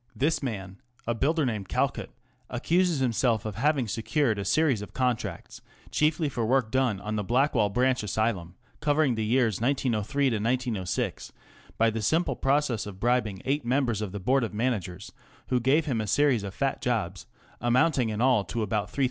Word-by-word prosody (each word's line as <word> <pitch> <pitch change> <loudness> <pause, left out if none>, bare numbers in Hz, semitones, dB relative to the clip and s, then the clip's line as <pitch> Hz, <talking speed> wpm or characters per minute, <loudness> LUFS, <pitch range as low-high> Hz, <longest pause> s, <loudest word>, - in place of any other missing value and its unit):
This 155 +4 +1
man, 100 -7 -5
" - - -33
a 115 - 0
builder 150 +6 +1
named 105 -6 -3
Calcutt/' - - -1 0.3
accuses 175 -1 +1
himself 120 -3 +1
of 110 - -3
having 135 +1 +1
secured 115 +1 0
a 100 - -3
series 145 -8 +2
of 105 - -10
contracts, 125 -3 -2 0.3
chiefly 155 +1 +1
for 120 -4 -2
work 120 -1 +1
done 130 -6 +1
on 105 +1 -4
the 105 - -1
Blackwall 120 -1 +2
Branch 125 +4 +1
Asylum, 105 -4 -2 0.2
covering 145 -2 +2
the 110 -1 -2
years 115 -2 +1
1903 125 -3 0
6, - - -3 0.5
by 115 0 +3
the 110 0 -3
simple 160 - +1
process 135 -6 0
of 95 -2 -9
bribing 115 -5 0
eight 140 +2 0
members 120 -3 0
of 105 -3 -3
the 100 - -5
Board 130 +7 +2
of 105 -3 -4
Managers, 105 -7 -2 0.4
who 125 - +2
gave 135 +6 +2
him 125 -7 -1
a 105 - -4
series 140 0 +3
of 100 -1 -7
fat 135 -1 -1
jobs, 100 -7 -2 0.3
amounting 125 +1 +2
in 110 +1 -3
all 125 -5 +4
to 110 +6 -3
about 105 0 -1
^3,000. - - -7
120 Hz, 180 wpm, -27 LUFS, 105-135 Hz, 0.5 s, all